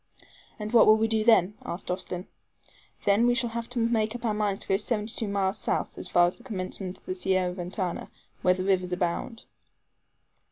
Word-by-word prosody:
"And 215 +1 -5
what 235 - +7
will 215 0 +7
we 220 0 +2
do 220 -1 +1
then?" 210 -4 +5
asked 180 +1 -5
Austin. 180 0 -4 0.8
"Then 205 +4 +4
we 245 - +3
shall 240 -2 0
have 230 0 -4
to 245 - -7
make 225 -1 +1
up 240 0 -6
our 220 - +1
minds 210 -2 -1
to - - -1
go 195 - +3
seventy 215 0 -1
two 220 - -1
miles 200 0 0
south, - - -1
as - - -4
far 175 -1 +5
as 175 - -2
the 240 - -18
commencement 185 -4 -4
of - - -24
the - - -2
Sierra 185 -1 0
Ventana, 180 0 -4 0.3
where 180 0 +4
rivers 185 -1 0
abound." 180 +6 -2
200 Hz, 200 wpm, -27 LUFS, 185-225 Hz, 0.8 s, what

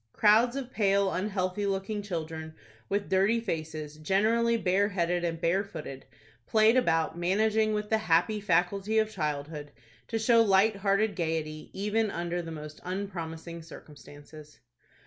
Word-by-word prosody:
Crowds 225 +4 +4
of 265 -2 -5
pale, 200 -3 +2
unhealthy 190 0 -1
looking 195 +2 -2
children, 160 -4 -5 0.3
with 200 0 -1
dirty 195 +5 +3
faces, 155 -7 -5
generally 220 +8 +2
bare 200 0 +2
headed 175 -2 0
and 165 -1 -2
bare 175 +4 +1
footed, 150 -8 -9 0.4
played 220 +1 +4
about, 165 -10 +2
managing, 215 +5 +1
with 210 0 -2
the 220 - +3
happy 210 +2 +2
faculty 195 +3 +1
of 220 0 +2
childhood, 150 -3 -4 0.4
to 225 - -2
show 230 +1 +4
light 205 0 +4
hearted 200 +1 +1
gayety, 160 -3 -3
even 210 +2 0
under 175 -1 -3
the 165 - -8
most 150 -1 -9
unpromising 170 -3 -5
circumstances. 150 -1 -13
190 Hz, 140 wpm, -29 LUFS, 165-215 Hz, 0.4 s, Crowds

